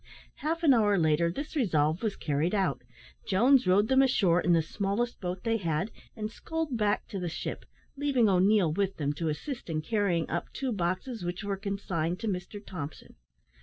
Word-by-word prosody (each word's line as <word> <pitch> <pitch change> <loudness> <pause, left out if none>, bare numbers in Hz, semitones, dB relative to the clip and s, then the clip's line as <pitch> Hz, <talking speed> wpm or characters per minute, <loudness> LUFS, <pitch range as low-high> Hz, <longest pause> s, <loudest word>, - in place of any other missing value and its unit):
Half 330 +2 -2
an 290 -4 +7
hour 210 -4 +3
later 165 0 +2
this 290 - -6
resolve 160 - +1
was 220 -3 -1
carried 155 +6 0
out. 195 -2 0 0.5
Jones 245 +6 +4
rowed 200 +3 +4
them 265 +2 +5
ashore 190 -10 +3
in 175 - +2
the 165 -2 +4
smallest 200 +8 -2
boat 180 0 -4
they 230 -1 +1
had, 170 +1 -1 0.2
and 215 -1 -4
sculled 320 +2 -3
back 210 -2 0
to 195 - -4
the 175 -1 -2
ship, - - -5 0.3
leaving 275 -5 +2
O'Neil 190 -3 +4
with 195 +2 -1
them 145 -1 -1
to 160 +2 -2
assist 235 - -5
in 155 -1 -2
carrying 195 -5 0
up 170 - -3
two 265 -2 -2
boxes 185 +4 -2
which 175 +4 -4
were 200 -1 -1
consigned 190 -4 -2
to 225 - -2
Mr 190 +1 -4
Thompson. 160 -5 -7
195 Hz, 185 wpm, -29 LUFS, 170-230 Hz, 0.5 s, an